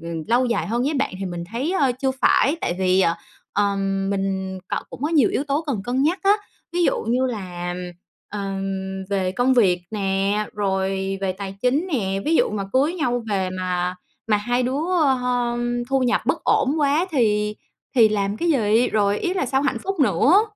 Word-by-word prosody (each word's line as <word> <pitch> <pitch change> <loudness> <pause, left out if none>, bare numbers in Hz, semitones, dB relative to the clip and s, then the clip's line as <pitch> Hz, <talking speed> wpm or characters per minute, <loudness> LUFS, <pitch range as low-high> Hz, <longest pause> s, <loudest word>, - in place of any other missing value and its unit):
ừm, 165 -1 -4
lâu 245 +2 +3
dài 235 - 0
hơn 235 +3 0
với 295 +4 0
bạn 275 -8 -1
thì 195 - -4
mình 175 -1 -5
thấy, 270 +9 -1
ơ, 275 -9 +2
chưa 265 - +2
phải. 290 +5 +4
Tại 175 - -1
vì, 185 0 +3
ờ, 170 -2 +3 0.4
ờm, 195 -1 0
mình 190 -1 -2
cọ - - -1
cũng 255 - -9
có 300 - +1
nhiều 300 -9 +4
yếu 275 - -1
tố 290 +2 0
cần 260 -9 -1
cân 255 +2 0
nhắc 335 +6 +2
á. 395 0 +5 0.4
Ví 350 +1 +1
dụ - - +1
như 250 +3 +1
là, 180 -6 -4 0.5
ờm, 195 -1 -4
về 190 -2 0
công 250 +5 +2
việc 185 -7 +3
nè, 200 0 0
rồi 195 -1 -1
về 190 -1 0
tài 195 0 -7
chính 270 +8 +2
nè, 195 -6 0
ví 325 - +2
dụ - - +3
mà 205 -2 -3
cưới 285 +6 +2
nhau 245 -8 -1
về 190 -2 0
mà 180 -1 -2 0.3
mà 210 - +4
hai 245 +4 0
đứa, 260 +3 -1 0.2
ơ 275 - +4
hơ, 245 -1 -1 0.3
thu 270 0 +2
nhập 245 - +2
bất - - 0
ổn 270 +2 +2
quá 295 +5 +2
thì 210 -7 +1 0.4
thì 225 -3 +7
làm 200 -1 -1
cái 340 - -1
gì? 230 -3 +3
Rồi 205 -1 +1
ý 365 +1 -1
là 365 - 0
sao 265 +2 +1
hạnh 265 -4 0
phúc 390 -3 -3
nữa? 275 - +4
215 Hz, 205 wpm, -22 LUFS, 195-265 Hz, 0.5 s, thì